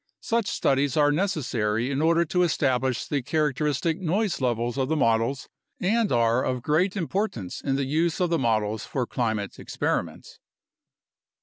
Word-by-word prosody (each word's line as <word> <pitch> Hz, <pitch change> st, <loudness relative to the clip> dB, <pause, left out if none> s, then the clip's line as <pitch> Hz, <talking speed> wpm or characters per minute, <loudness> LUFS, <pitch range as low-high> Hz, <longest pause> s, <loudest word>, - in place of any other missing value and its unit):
Such 230 Hz, -3 st, 0 dB
studies 140 Hz, -4 st, +1 dB
are 145 Hz, -1 st, +4 dB
neces 175 Hz, 0 st, 0 dB
sary 115 Hz, +1 st, -1 dB
in 140 Hz, +1 st, -1 dB
order 165 Hz, +1 st, +3 dB
to 180 Hz, +3 st, 0 dB
establish 130 Hz, -6 st, +1 dB
the 145 Hz, -2 st, -1 dB
characteristic 150 Hz, +3 st, 0 dB
noise 190 Hz, 0 st, 0 dB
levels 120 Hz, -1 st, 0 dB
of 130 Hz, 0 st, 0 dB
the 160 Hz, -, +1 dB
models 115 Hz, 0 st, +1 dB, 0.3 s
and 220 Hz, +4 st, +1 dB
are 115 Hz, +1 st, +2 dB
of 125 Hz, -2 st, -2 dB
great 180 Hz, +8 st, +1 dB
importance 175 Hz, -, -3 dB
in 135 Hz, -1 st, -1 dB
the 140 Hz, 0 st, 0 dB
use 160 Hz, +6 st, 0 dB
of 180 Hz, -2 st, +1 dB
the 165 Hz, -, +2 dB
models 110 Hz, -3 st, 0 dB
for 130 Hz, -3 st, -2 dB
climate 110 Hz, -5 st, -2 dB
ex -, -, -9 dB
periments. -, -, -2 dB
140 Hz, 165 wpm, -25 LUFS, 120-170 Hz, 0.3 s, are